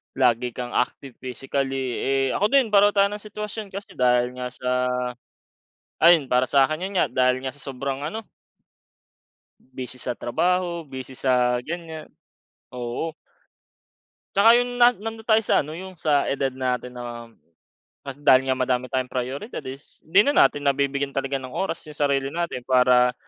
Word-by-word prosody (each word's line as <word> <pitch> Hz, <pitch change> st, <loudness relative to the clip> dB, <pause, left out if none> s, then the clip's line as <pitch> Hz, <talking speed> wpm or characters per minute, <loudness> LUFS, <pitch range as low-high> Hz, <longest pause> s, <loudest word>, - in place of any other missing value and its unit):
lagi 125 Hz, -1 st, +2 dB
kang 125 Hz, -1 st, -5 dB
active 125 Hz, +1 st, -2 dB
physically, 135 Hz, 0 st, -3 dB
eh. 135 Hz, 0 st, +1 dB
Ako 205 Hz, -, +2 dB
din 270 Hz, -5 st, +3 dB
pareho 205 Hz, 0 st, +6 dB
tayo 200 Hz, 0 st, +5 dB
ng 210 Hz, -, -5 dB
sitwasyon. 210 Hz, 0 st, -6 dB
Kasi, 200 Hz, +1 st, -8 dB
dahil 125 Hz, 0 st, +3 dB
nga 125 Hz, 0 st, -4 dB
sa 125 Hz, 0 st, -5 dB, 1.3 s
ayun 165 Hz, -3 st, +6 dB
para 125 Hz, +1 st, +3 dB
sa'kin, 140 Hz, +4 st, +3 dB
yun 200 Hz, -, -8 dB
nga, -, -, +4 dB
dahil 130 Hz, 0 st, +2 dB
nga 135 Hz, -, -3 dB
sa 145 Hz, -, -15 dB
sobrang 135 Hz, +1 st, -4 dB
ano 220 Hz, +8 st, -5 dB, 1.4 s
Busy 130 Hz, -1 st, -8 dB
sa -, -, -2 dB
trabaho, 175 Hz, +6 st, 0 dB
busy 130 Hz, -1 st, -8 dB
sa 125 Hz, -1 st, +2 dB
ganyan, 160 Hz, +1 st, -7 dB, 0.7 s
oo. 125 Hz, +6 st, -3 dB, 1.3 s
Tsaka, 225 Hz, +4 st, +7 dB
yung 245 Hz, 0 st, -3 dB
na 240 Hz, 0 st, +7 dB
nandon 225 Hz, +1 st, -7 dB
tayo 220 Hz, -1 st, +5 dB
sa -, -, +3 dB
ano 150 Hz, -, -8 dB
yung 185 Hz, +2 st, -9 dB
sa 145 Hz, -3 st, +2 dB
edad 135 Hz, -1 st, -1 dB
natin 125 Hz, -1 st, -2 dB
na 120 Hz, -1 st, -7 dB, 0.8 s
dahil 135 Hz, -1 st, +3 dB
nga 130 Hz, -, +2 dB
madami 125 Hz, -1 st, 0 dB
tayong 130 Hz, -1 st, -1 dB
prioridad 135 Hz, -, -4 dB
is 135 Hz, +2 st, -10 dB
'di 175 Hz, +5 st, +5 dB
na 285 Hz, -, +2 dB
natin 145 Hz, 0 st, +4 dB
nabibigyan 140 Hz, 0 st, 0 dB
talaga 135 Hz, 0 st, -1 dB
ng 130 Hz, -1 st, -9 dB
oras 195 Hz, -, -3 dB
yung 150 Hz, -, -6 dB
sarili 140 Hz, -2 st, +1 dB
natin 170 Hz, -3 st, -3 dB
para 125 Hz, -1 st, +4 dB
135 Hz, 155 wpm, -24 LUFS, 125-170 Hz, 1.4 s, Tsaka